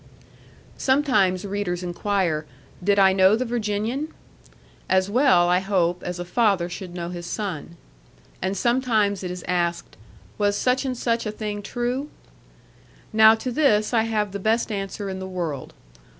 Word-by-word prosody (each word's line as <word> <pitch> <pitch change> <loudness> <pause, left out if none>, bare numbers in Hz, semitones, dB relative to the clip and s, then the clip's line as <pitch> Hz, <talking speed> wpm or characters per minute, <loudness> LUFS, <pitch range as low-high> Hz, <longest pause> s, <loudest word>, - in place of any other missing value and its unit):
Sometimes 230 -9 +2
readers 195 -3 -3
inquire, 175 -3 -1 0.4
Did 200 +2 +3
I 190 -1 +6
know 190 +2 +5
the 250 +3 -1
Virginian? 230 +4 -2 0.8
As 190 +1 +2
well, 205 -8 +4
I 180 +1 +3
hope, 180 -2 0
as 180 0 -4
a 175 - -5
father 195 -2 +2
should 180 -1 -7
know 170 -1 -4
his 175 -1 -6
son. 170 -6 -5 0.6
And 190 +2 -1
sometimes 220 -4 +1
it 180 - -3
is 180 0 -6
asked, 175 -1 -1 0.4
Was 205 -1 +2
such 255 +5 +1
and 255 -2 -2
such 230 -1 0
a - - -2
thing 210 -1 -5
true? 245 +6 -3 1.0
Now 220 0 +7
to 250 +3 -4
this 235 -6 +2
I 225 -1 +3
have 210 -3 -1
the 200 - -5
best 220 +3 +1
answer 200 0 -4
in 190 -1 -4
the 190 - -5
world. 170 -7 -4
200 Hz, 155 wpm, -24 LUFS, 180-225 Hz, 1.0 s, Now